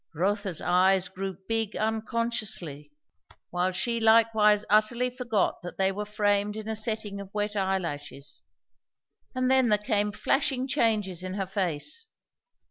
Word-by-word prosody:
Rotha's 195 0 -1
eyes 185 +1 +3
grew 190 -1 -5
big 225 -2 -1
unconsciously, 215 -9 -2 0.6
while 180 +1 0
she 235 +5 0
likewise 220 -2 +4
utterly 235 +4 +2
forgot 240 -5 -1
that 175 - -8
they 190 0 +2
were 210 +2 -5
framed 205 0 +1
in 215 0 -6
a 220 - -2
setting 215 -2 -2
of 195 -1 -11
wet 210 0 -1
eyelashes; 170 -8 -3 0.9
and 255 0 +1
then 260 -2 +4
there 210 - +4
came 210 -1 0
flashing 265 +3 0
changes 215 - +1
in 185 0 -5
her 195 -1 -2
face. 190 - -1
210 Hz, 135 wpm, -27 LUFS, 190-225 Hz, 0.9 s, likewise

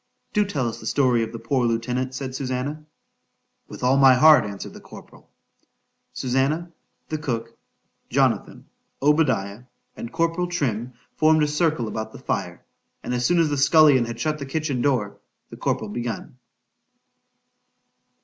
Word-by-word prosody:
—Do 210 -1 +3
tell 140 -11 -2
us 115 - -5
the 110 - -8
story 125 -4 +2
of 115 - -3
the 115 - -6
poor 130 +2 -1
lieutenant, 125 +3 -2
said 130 0 -5
Susannah.——With 140 +4 -8
all 130 +2 +3
my 135 -2 +7
heart, 150 -1 +7
answered 100 -1 -7
the - - -11
corporal. - - -15 0.8
Susannah, 135 +7 -1 0.4
the 155 - -3
cook, 115 -5 -4 0.5
Jonathan, - - 0 0.4
Obadiah, 130 -8 +1 0.3
and 115 - -7
corporal 165 +2 0
Trim, 125 -9 -2 0.2
formed 155 0 +4
a - - +2
circle 150 -5 0
about 110 0 -5
the - - -9
fire; - - -4 0.4
and - - -3
as 125 0 +1
soon 175 - +2
as 165 -2 +3
the 145 - 0
scullion 145 -3 +5
had 115 0 -7
shut 155 +4 -1
the 140 - -5
kitchen 140 -3 -2
door,—the 120 -8 -3
corporal 110 -2 -2
begun. 120 +2 -5
130 Hz, 145 wpm, -23 LUFS, 120-155 Hz, 0.8 s, my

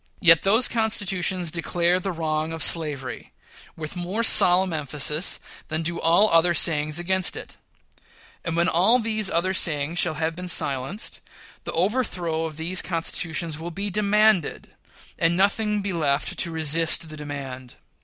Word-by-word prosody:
Yet 165 -2 +5
those 220 +6 +4
constitutions 190 -6 0
declare 175 +1 0
the 195 +1 -4
wrong 160 -1 -3
of 165 -2 -3
slavery, 140 -7 -1 0.4
with 155 +1 -7
more 180 +6 -3
solemn 185 -4 +6
emphasis 150 +2 -1 0.3
than 160 +1 -3
do 170 +1 -3
all 170 +6 +4
other 170 +1 +3
sayings 155 -1 +2
against 185 +1 0
it; - - -9 0.9
and 165 -1 -4
when 170 +1 +2
all 185 +8 +3
these 220 -3 -1
other 185 +3 -1
sayings 160 -2 +1
shall 160 -3 0
have 160 +1 -3
been 180 +1 -7
silenced, 140 - -1 0.4
the - - -3
overthrow 175 -5 -1
of 155 -2 -8
these 175 +3 +1
constitutions 165 -2 -3
will 165 +2 -6
be 195 +4 -4
demanded, 210 -3 +1 0.5
and 165 +1 +1
nothing 210 +1 0
be 195 -1 -3
left 145 -4 -1
to - - +1
resist 160 +1 0
the 155 - -10
demand. 135 -4 -8
170 Hz, 150 wpm, -23 LUFS, 155-190 Hz, 0.9 s, solemn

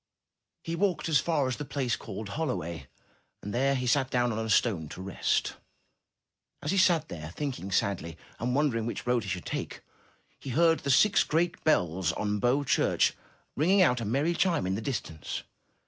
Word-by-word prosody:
He 165 - -3
walked 180 -3 0
as 150 - +4
far 150 -5 +1
as 130 - -2
the 150 - -4
place 135 -4 -1
called 105 -1 -7
Holloway, 85 - -3 0.6
and 105 - -5
there 135 +3 +2
he 125 -1 -2
sat 130 +1 +2
down 125 -1 +1
on 110 0 -2
a 110 - -4
stone 100 -8 +2
to 90 - -9
rest. 95 0 -1 1.1
As 145 - -1
he 195 - +1
sat 170 -4 +3
there, 80 -2 -7
thinking 130 -10 -4
sadly, 85 -4 -1 0.2
and 125 +2 -1
wondering 125 -6 +1
which 120 - -4
road 125 -1 +2
he 100 - -6
should 90 -1 -4
take, - - -4 0.6
he - - -8
heard 165 +5 +3
the 140 - -4
six 200 +10 +5
great 170 +2 0
bells 90 - +2
on 105 +2 -1
Bow 125 +6 +2
Church, - - +2 0.4
ringing 185 +7 +4
out 125 -7 +2
a - - -3
merry 140 +10 +1
chime 170 - +1
in 95 - 0
the 105 - -2
distance. 110 - -4
125 Hz, 185 wpm, -29 LUFS, 100-150 Hz, 1.1 s, six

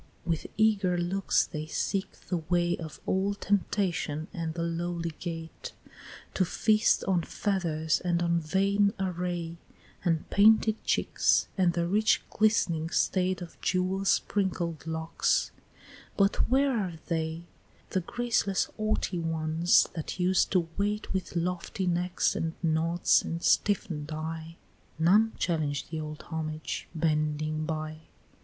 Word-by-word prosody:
with 165 -2 -1
eager 205 -5 +3
looks 180 +3 +1
they 155 0 -6
seek 195 +4 -2 0.2
the 180 - +1
way 175 +1 +1
Of 160 -3 -8
old 200 +2 0
temptation 175 -6 0
at 165 -2 -4
the 170 - -2
lowly 170 0 -2
gate; 165 -2 -6 0.6
To 190 - +2
feast 215 +5 +2
on 185 -3 +2
feathers, 165 -5 -1
and 175 -1 0
on 170 0 +2
vain 200 +5 +2
array, 175 -2 -3 0.5
And 165 -3 0
painted 220 +1 +5
cheeks, - - +2
and 180 -3 +3
the 170 0 0
rich 215 +4 +2
glistering 170 -7 +2
state 185 0 +1
Of 170 - -13
jewel 185 +1 0
sprinkled 175 -6 0
locks, 160 0 0 0.7
But 195 0 +2
where 270 +1 +3
are 185 -5 -3
they, 160 -1 -2 0.5
The 185 - +1
graceless 220 -1 0
haughty 215 -4 -1
ones 165 +1 +2
that 165 +2 -5
used 180 +1 +3
to 175 -3 +2
wait 205 +1 -1
With 185 -2 -3
lofty 180 +2 -2
neck, 180 0 -1
and 165 0 -2
nods, 165 +2 +3
and 170 +1 -5
stiffen'd 160 -7 +1
eye? 160 +1 -5 0.4
None 205 +8 +4
challenge 150 -5 -1
the 160 0 -4
old 155 0 -6
homage 155 -1 -4
bending 155 -1 0
by. 155 0 -5
175 Hz, 130 wpm, -29 LUFS, 160-195 Hz, 0.7 s, painted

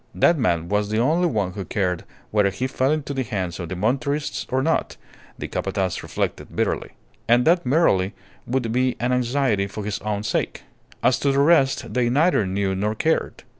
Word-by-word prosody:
That 175 - +4
man 85 - 0
was 105 +2 0
the 110 - 0
only 160 +9 +3
one 105 - -1
who 100 0 -5
cared 90 -1 -2 0.3
whether 105 -2 +3
he 125 +6 -3
fell 130 +1 0
into 150 -2 -2
the 135 - -1
hands 95 -7 -3
of 85 -2 -5
the 95 - -4
Monterists 135 +9 -1
or 130 +1 +1
not, 165 +2 0 0.4
the - - -5
Capataz 95 -2 -2
reflected - - -4
bitterly. - - -1 0.3
And 120 +1 +4
that 170 -4 +3
merely 115 - +2 0.3
would 120 -2 -1
be 125 +1 +1
an 120 +2 0
anxiety 125 -5 +1
for 100 +1 -6
his 105 -1 -2
own 105 -1 -3
sake. 110 - -2 0.4
As - - +3
to 140 - +2
the 135 - 0
rest, 140 -2 +3
they 125 -1 +2
neither 145 - +3
knew 95 0 0
nor 105 +3 -1
cared. 160 +8 -1
120 Hz, 190 wpm, -23 LUFS, 100-135 Hz, 0.4 s, That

